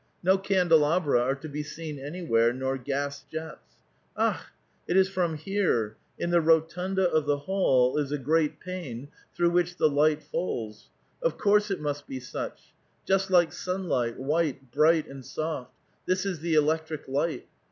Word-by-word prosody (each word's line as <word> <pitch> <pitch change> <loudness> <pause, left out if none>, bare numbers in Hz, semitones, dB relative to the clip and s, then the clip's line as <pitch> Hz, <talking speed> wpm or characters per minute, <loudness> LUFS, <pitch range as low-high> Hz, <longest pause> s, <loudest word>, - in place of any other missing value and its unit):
no 190 +2 +5
candelabra 170 -7 +3
are 130 +3 +1
to 140 +3 -9
be 150 0 -4
seen 150 -1 -7
anywhere, 140 -6 +1
nor 130 +2 -2
gas 140 +2 -3
jets. 160 0 -8 0.4
Akh! - - 0 0.4
it 180 - +2
is 190 0 +5
from 180 -4 -1
here 155 - 0
— - - -41
in 170 - -2
the 170 -1 +4
rotunda 180 +4 +2
of 155 -3 +1
the 145 -1 +2
hall 140 -6 +2
is 145 -1 -2
a 150 - 0
great 150 +3 +1
pane 145 -8 -6 0.3
through 175 0 +2
which 175 0 +1
the - - +4
light 150 +1 +2
falls; 110 -11 -4 0.3
of - - 0
course 210 0 +3
it 195 - -1
must 145 -1 -3
be 130 - -5
such 125 - -7
— - - -41
just 195 0 +2
like 175 -3 +4
sunlight, 175 -11 -2
wliite, 135 -2 -1
bright, 155 +2 +3
and 135 -1 -10
soft; 155 -2 -4 0.4
this 185 +1 +1
is 185 -5 -2
the 165 0 0
electric 155 0 0
light. 145 +5 -1
155 Hz, 170 wpm, -27 LUFS, 140-180 Hz, 0.4 s, no